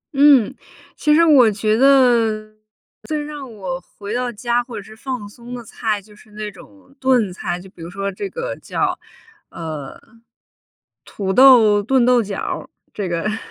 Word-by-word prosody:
嗯， 275 -5 +5 0.4
其 300 - +2
实 335 - +5
我 275 -8 +6
觉 215 +1 0
得 235 -5 +3 0.5
最 310 -2 -2
让 290 -4 -8
我 185 -4 -5 0.2
回 205 +1 -6
到 245 0 -1
家 240 +2 -1
或 240 -2 -9
者 205 - -7
是 215 +2 -14
放 250 -3 -5
松 240 +4 -10
的 240 - -8
菜， 215 -1 -2
就 210 +1 -18
是 215 - -20
那 210 0 -6
种 270 +9 -18
炖 245 -8 +2
菜， 180 -1 -4
就 190 - -12
比 175 - -16
如 165 - -7
说 195 +2 -4
这 290 - -5
个 485 +3 -5
叫， - - -2 0.5
呃， 155 -4 -7 1.0
土 190 -2 -4
豆 230 -5 +7
炖 250 +3 +2
豆 250 -1 +4
角 205 -2 -5
儿， - - -5 0.2
这 195 -4 -4
个 170 -1 -2
这 215 - -1
个 220 - -3
220 Hz, 190 characters per minute, -20 LUFS, 205-255 Hz, 1.0 s, 豆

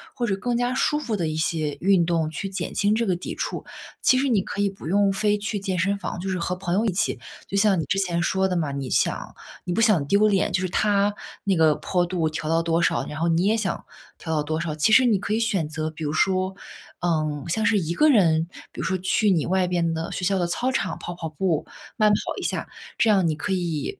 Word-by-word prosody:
或 245 - -1
者 205 -4 0
更 240 +4 -2
加 245 +1 0
舒 295 +3 +1
服 225 -7 -2
的 165 -3 -1
一 155 - -3
些 160 -2 -1
运 185 -2 +4
动 165 -2 0
去 160 +5 -4
减 195 0 -4
轻 205 +1 +2
这 230 0 0
个 185 - +1
抵 175 - -6
触。 - - -4 0.4
其 255 - +4
实 275 0 +1
你 215 -5 +3
可 200 +2 -4
以 200 - +2
不 195 -5 -10
用 200 +2 +3
非 210 +1 +1
去 205 0 -3
健 190 -2 -2
身 200 +4 +1
房， 180 -2 -5
就 190 +2 -4
是 185 -2 -1
和 180 +2 -1
朋 180 -1 -3
友 210 +4 +2
一 215 - +2
起 200 - 0 0.3
就 200 - -2
像 200 -2 +4
你 - - 0
之 195 +7 0
前 170 -3 0
说 190 +2 +1
的 185 - -2
嘛， 155 -4 -1
你 140 -2 -4
想 - - 0 0.3
你 175 - -2
不 225 - +1
想 205 -11 +4
丢 205 +4 +4
脸， 195 -2 +1
就 185 - +1
是 185 - -2
他 205 +1 +2 0.3
那 195 -2 +1
个 155 -2 +4
坡 180 +3 0
度 170 -3 -1
调 155 0 -5
到 165 +1 +2
多 165 0 +1
少， - - +1
然 150 - -6
后 170 - +1
你 165 +2 +2
也 220 +3 +2
想 210 -3 -3 0.3
调 160 -1 -4
到 150 - +1
多 155 +2 -2
少。 160 -3 -3
其 155 +8 +2
实 260 +1 +7
你 220 -5 +3
可 205 +2 -2
以 225 - +1
选 195 -9 0
择 155 0 -3
比 155 0 -6
如 145 - -2
说 185 +3 +1 0.5
嗯， 155 -4 -1
像 220 +5 0
是 225 -2 +3
一 170 -2 -1
个 305 - +4
人 165 - +4 0.2
比 - - -11
如 - - -2
说 185 +3 0
去 190 +2 +2
你 165 -5 +1
外 185 0 +1
边 170 -2 0
的 160 0 -3
学 185 - -4
校 190 +1 +1
的 175 - 0
操 250 +9 0
场 195 -7 -2
跑 175 - -6
跑 170 -2 -6
步， 160 0 -1 0.3
慢 215 -2 +4
跑 - - +4 0.2
一 - - -6
下。 - - -2 0.3
这 225 - +3
样 195 -4 +4
你 - - +1
可 175 +5 -2
以， 170 -5 -3
185 Hz, 285 characters per minute, -24 LUFS, 165-205 Hz, 0.5 s, 实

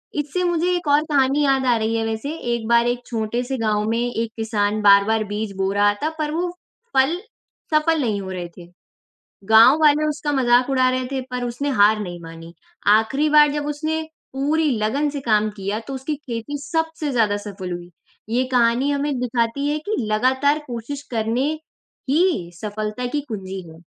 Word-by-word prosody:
इससे 300 +5 -2
मुझे 350 0 +1
एक 350 -2 -4
और 290 +1 +5
कहानी 275 +1 +3
याद 270 -1 +2
आ 245 -2 +4
रही 220 +1 -1
है 225 - -1
वैसे, 225 +4 -3
एक 235 -7 -3
बार 235 0 +4
एक 245 0 0
छोटे 230 +1 -2
से 265 +1 -3
गाँव 215 -2 0
में 230 - 0
एक 230 -2 -2
किसान 215 -1 0
बार-बार 205 +2 +5
बीज 205 0 -4
बो 195 0 0
रहा 205 0 +3
था 310 - +1
पर 300 -1 -1
वो 345 +3 -1 0.5
फल 270 +6 +3 0.6
सफल 305 +1 +3
नहीं 215 -6 -1
हो 190 -1 -6
रहे 180 -2 -5
थे। 175 -1 -11 0.8
गाँव 225 +6 +8
वाले 305 0 +4
उसका 295 0 -2
मज़ाक 250 -1 +3
उड़ा 260 -1 +3
रहे 255 0 -1
थे, 265 - -1
पर 250 -1 -5
उसने 245 +4 -3
हार 215 -4 +4
नहीं 175 -4 -6
मानी, 165 0 -11 0.3
आखिरी 225 +9 +3
बार 300 -1 +6
जब 295 0 -3
उसने 310 +2 -2 0.3
पूरी 300 +4 +1
लगन 275 +8 0
से 285 0 -4
काम 215 -3 +2
किया 200 +2 -3
तो 275 - -5
उसकी 265 +3 -3
खेती 240 +4 -4
सबसे 320 -2 -2
ज़्यादा 220 -5 +2
सफल 200 -3 -7
हुई। 175 0 -8 0.4
ये 245 +3 +1
कहानी 245 +3 +3
हमें 285 -1 -1
दिखाती 245 +3 -1
है 300 +1 -1
कि 435 - 0 0.2
लगातार 260 +7 +2
कोशिश 250 +4 -6
करने 235 +5 0 0.6
ही 300 - +1
सफलता 215 +2 -4
की 295 - 0
कुंजी 190 -3 -5
है। 160 +1 -15
245 Hz, 185 wpm, -21 LUFS, 215-290 Hz, 0.8 s, गाँव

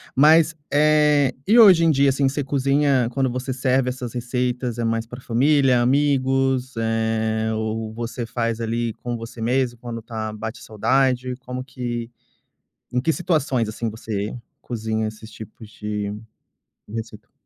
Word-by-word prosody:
Mas, 160 +3 +6 0.2
eh, 150 -2 +4
e 225 +4 +5
hoje 185 -7 +8
em - - +5
dia. 140 -2 +4
assim, 135 +1 +1
você 140 +2 -1
cozinha 140 -2 +2
quando 135 -1 +1
você 130 +1 -3
serve 130 0 +1
essas 125 -2 -5
receitas, 125 0 -2
é 120 - -2
mais 115 0 -1
pra 125 +2 -9
família, 130 +1 +3
amigos, 135 -1 +1
eh, 110 0 0
ou 110 0 -3
você 120 +1 -4
faz, 115 0 -2
ali, 115 0 -2
com 120 -1 -5
você 115 +1 -8
mesmo 120 0 0
quando 115 -2 -6
tá 110 -1 -5
bate 110 +1 -6
saudade, 125 +3 +1
como 130 -1 -6
que 120 -2 -5 0.8
em 125 0 0
que 160 - +2
situações, 150 - 0
assim, 110 +2 -3
você 110 0 -4 0.2
cozinha 110 -2 -2
esses 110 +1 -10
tipos 110 +1 -11
de 105 -1 -4 0.8
receita? 110 -1 -8
125 Hz, 150 wpm, -22 LUFS, 115-135 Hz, 0.8 s, hoje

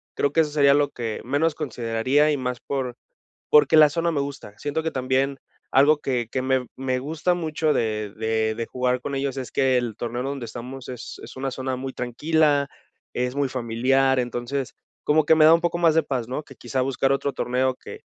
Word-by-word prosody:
creo 145 0 0
que 165 - +5
eso 150 - 0
sería 140 -2 +5
lo 145 0 +2
que 115 -3 -5
menos 145 +5 +1
consideraría 130 +1 +1
y 145 - 0
más 125 -1 -3
por 130 -3 -3 0.6
porque 150 +1 +6
la 155 -1 +8
zona 165 +2 0
me 145 - 0
gusta. 140 -7 -7
Siento 145 +2 -2
que 160 - -1
también 135 +1 0 0.3
algo 145 +3 +5
que 125 -5 -2
que 130 -1 -2
me 130 -2 0
me 130 -1 -1
gusta 155 +6 -1
mucho 160 -2 0
de 110 -2 -1
de 110 0 0
de 115 +1 -4
jugar 125 0 -1
con 140 +2 -4
ellos 135 0 -2
es 125 -4 -5
que 130 -2 +2
el 120 -3 -2
torneo 120 +2 -4
donde 135 -1 -4
estamos 125 +3 -8
es 125 -2 -8
es - - -10
una 135 +1 -3
zona 130 0 -3
muy 130 +1 -5
tranquila, 145 +3 +1 0.5
es 125 0 -1
muy 140 -2 0
familiar, 130 +2 +1
entonces 125 +2 -3 0.3
como 155 +1 +3
que 160 - +5
me 155 -1 +6
da 160 - +8
un 170 - -1
poco 170 0 -1
más 165 -2 +4
de 160 - +4
paz, 130 -5 -3
¿no?, 130 +5 -4
que 135 - -14
quizá 125 +3 -3
buscar 135 +1 +1
otro 140 0 0
torneo 130 +1 0
que - - -11
135 Hz, 210 wpm, -24 LUFS, 125-145 Hz, 0.6 s, la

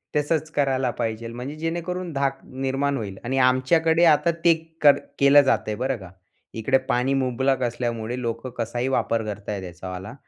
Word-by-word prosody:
तसंच 155 +1 0
करायला 135 -3 +1
पाहिजे. 115 0 -2
म्हणजे 125 +5 -6
जेणेकरून 170 +2 -3
धाक 135 -1 -1
निर्माण 135 +2 -2
होईल 100 -4 -5
आणि 130 +3 -2
आमच्याकडे 160 +6 +2
आता 165 +1 +4
ते 170 - +7 0.3
कर 145 -2 +7 0.2
केलं 140 +1 +7
जातंय, 120 -5 0
बरं 130 +4 -1
का. 95 -3 -12 0.4
इकडे 120 +4 +2
पाणी 125 +2 +1
मुबलक 130 +1 0
असल्यामुळे 120 0 -2
लोकं 115 +1 -3
कसाही 120 +2 -2
वापर 115 -1 0
करतायेत 100 -1 -6
याच्यावाला 90 +3 -7
130 Hz, 150 wpm, -24 LUFS, 115-145 Hz, 0.4 s, ते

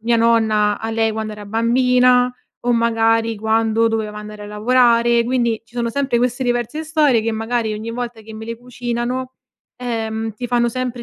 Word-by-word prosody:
mia 235 +1 +2
nonna 220 -3 +2
a 225 - -3
lei 225 0 +1
quando 215 0 -4
era 210 -1 -9
bambina, 250 +3 +3 0.3
o 245 - +3
magari, 225 -1 +2
quando 225 +1 +2
doveva 220 -2 -3
andare 210 0 -9
a - - -8
lavorare. 235 +2 +3
Quindi, 235 -2 0
ci 230 - -26
sono 235 -1 -1
sempre 270 0 0
queste 245 +1 0
diverse 240 +4 -1
storie 300 -6 +3
che, 225 - -1
magari, 225 0 -1
ogni 220 +2 -5
volta 240 -1 -5
che 220 +1 -11
me 220 0 -8
le 230 0 -5
cucinano, 245 +1 -4 0.4
ehm, 225 -2 -3
ti 245 +3 -5
fanno 240 0 +2
sempre 250 0 -4
230 Hz, 180 wpm, -19 LUFS, 220-245 Hz, 0.4 s, bambina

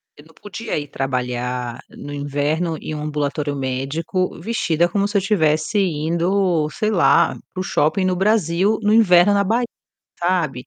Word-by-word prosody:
Eu 145 - -16
não 160 - -21
podia 210 -1 -5
ir 145 -1 -4
trabalhar 125 -2 -3
no 145 - -9
inverno 145 +4 -1
em 155 - -6
um 150 - -5
ambulatório 150 -1 -2
médico 140 +8 -2
vestida 170 -5 0
como 200 +3 0
se 205 0 0
eu - - +5
estivesse 160 -1 +1
indo, 170 0 +1
sei 215 +6 -1
lá, 180 - +4 0.2
para 185 - -7
o - - -2
shopping 185 +3 +1
no 185 -1 +1
Brasil 195 0 +2
no 210 +1 +3
inverno 200 -3 +5
na 200 0 +3
Bahia, 235 +5 +1 0.5
sabe? 170 -8 -1
165 Hz, 165 wpm, -20 LUFS, 145-195 Hz, 0.5 s, eu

